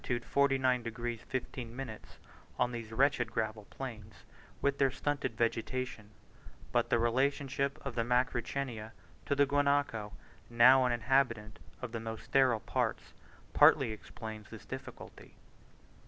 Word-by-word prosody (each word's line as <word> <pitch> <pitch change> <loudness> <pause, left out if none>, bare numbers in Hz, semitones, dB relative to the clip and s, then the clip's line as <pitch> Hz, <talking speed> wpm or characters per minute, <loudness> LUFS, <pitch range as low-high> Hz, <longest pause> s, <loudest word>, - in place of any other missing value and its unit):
49 135 -2 +2
degs. 115 0 -4
15', 125 -2 -5 0.6
on 125 0 +1
these 115 -2 -6
wretched 125 -1 +2
gravel 110 -2 -2
plains, 110 -6 -8 0.4
with 140 0 0
their 135 -1 +4
stunted 130 -3 -2
vegetation; 115 -1 -2 0.6
but - - +1
the - - +4
relationship 135 +3 0
of - - -3
the 115 - 0
Macrauchenia 125 -1 -1 0.3
to 140 - +2
the 145 0 +5
Guanaco, 140 -7 +1 0.4
now 125 +3 +7
an 125 - +2
inhabitant 120 -3 +1 0.2
of 125 - -4
the 115 - -3
most 110 0 -6
sterile 130 -5 +3
parts, - - -2 0.4
partly 115 - +6
explains 110 0 -8
this - - -11
difficulty. - - -9
120 Hz, 125 wpm, -32 LUFS, 115-135 Hz, 0.6 s, now